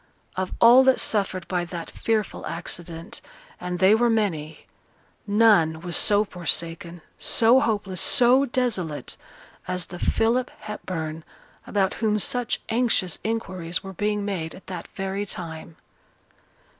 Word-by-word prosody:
Of 185 Hz, 0 st, -2 dB
all 240 Hz, +3 st, +8 dB
that 265 Hz, -1 st, +4 dB
suffered 185 Hz, -5 st, 0 dB
by 180 Hz, -1 st, -1 dB
that 170 Hz, -1 st, -7 dB
fearful 220 Hz, -2 st, -2 dB
accident 170 Hz, +1 st, -6 dB, 0.4 s
(and 180 Hz, 0 st, -4 dB
they 190 Hz, +3 st, +5 dB
were 235 Hz, +2 st, +3 dB
many) 165 Hz, -9 st, -1 dB, 0.6 s
none 205 Hz, -7 st, +4 dB
was 175 Hz, -1 st, -5 dB
so 205 Hz, +1 st, +3 dB
forsaken, 170 Hz, -2 st, -3 dB, 0.2 s
so 235 Hz, +3 st, +5 dB
hopeless, 205 Hz, -7 st, -1 dB
so 255 Hz, +3 st, +5 dB
desolate, 195 Hz, -, -2 dB, 0.5 s
as 180 Hz, -1 st, -2 dB
the 175 Hz, +1 st, -9 dB
Philip 240 Hz, +3 st, +1 dB
Hepburn 165 Hz, -7 st, -5 dB, 0.4 s
about 195 Hz, -2 st, +1 dB
whom 215 Hz, -2 st, +2 dB
such 245 Hz, +3 st, 0 dB
anxious 225 Hz, -7 st, 0 dB
inquiries 185 Hz, -6 st, -3 dB
were 195 Hz, 0 st, -8 dB
being 205 Hz, +2 st, -1 dB
made 175 Hz, -6 st, -3 dB
at 190 Hz, -, -14 dB
that 180 Hz, -3 st, -7 dB
very 195 Hz, +1 st, -2 dB
time. 165 Hz, -4 st, -7 dB
190 Hz, 130 wpm, -24 LUFS, 170-220 Hz, 0.6 s, all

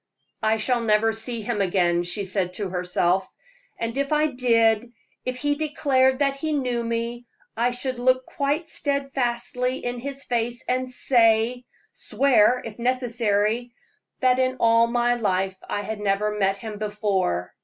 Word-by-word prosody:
"I 220 Hz, 0 st, +2 dB
shall 240 Hz, +2 st, 0 dB
never 220 Hz, 0 st, +3 dB
see 225 Hz, 0 st, -2 dB
him 210 Hz, -1 st, -1 dB
again," 175 Hz, -2 st, +2 dB
she 175 Hz, +4 st, -1 dB
said 190 Hz, -1 st, -1 dB
to 200 Hz, 0 st, -3 dB
herself; 180 Hz, +1 st, 0 dB, 0.5 s
"and 230 Hz, +1 st, -3 dB
if 280 Hz, +1 st, -1 dB
I 305 Hz, 0 st, +2 dB
did 230 Hz, -2 st, +2 dB, 0.3 s
if 255 Hz, 0 st, -2 dB
he 290 Hz, +2 st, 0 dB
declared 275 Hz, -3 st, +1 dB
that 275 Hz, 0 st, +1 dB
he 310 Hz, +2 st, -2 dB
knew 250 Hz, -4 st, -1 dB
me 235 Hz, +1 st, -3 dB, 0.3 s
I 235 Hz, +2 st, +2 dB
should 250 Hz, 0 st, -3 dB
look 255 Hz, +1 st, +2 dB
quite 290 Hz, +4 st, -2 dB
steadily 260 Hz, -3 st, -1 dB
in 245 Hz, 0 st, -3 dB
his 275 Hz, +2 st, -5 dB
face 240 Hz, 0 st, -2 dB
and 255 Hz, 0 st, -1 dB
say 240 Hz, -1 st, +2 dB, 0.3 s
swear, 250 Hz, -3 st, +3 dB
if 225 Hz, 0 st, -8 dB
necessary 235 Hz, -2 st, 0 dB, 0.5 s
that 255 Hz, -1 st, +3 dB
in 255 Hz, 0 st, +1 dB
all 230 Hz, 0 st, +4 dB
my 240 Hz, 0 st, +1 dB
life 190 Hz, -4 st, -1 dB
I 205 Hz, -, -1 dB
had 215 Hz, +1 st, -5 dB
never 210 Hz, +1 st, 0 dB
met 195 Hz, -1 st, +1 dB
him 210 Hz, 0 st, -7 dB
before. 200 Hz, -, -1 dB
235 Hz, 155 wpm, -24 LUFS, 210-255 Hz, 0.5 s, all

